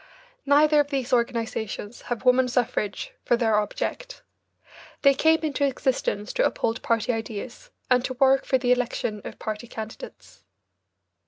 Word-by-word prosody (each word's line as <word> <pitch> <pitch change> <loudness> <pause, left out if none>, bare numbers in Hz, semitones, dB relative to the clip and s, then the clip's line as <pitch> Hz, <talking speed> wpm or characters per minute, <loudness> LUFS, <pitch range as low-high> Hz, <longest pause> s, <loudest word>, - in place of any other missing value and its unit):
Neither 300 +1 +5
of 290 - +2
these 270 -4 -2
organisations 230 -2 -2
have 240 +1 -3
woman 250 0 +5
suffrage 245 - -2
for 240 - +2
their 220 -3 +2
object. - - -4 0.8
They 275 -1 +7
came 320 +4 +3
into 300 -2 -1
existence 255 -6 -1
to - - +1
uphold 230 +2 0
party 230 +1 0
ideas 225 - -6 0.2
and 250 -1 +3
to 255 - -4
work 270 +1 +4
for 260 - +2
the 250 -1 0
election 240 -4 -1
of - - -8
party 215 +2 -5
candidates. 225 - -9
250 Hz, 145 wpm, -25 LUFS, 225-275 Hz, 0.8 s, They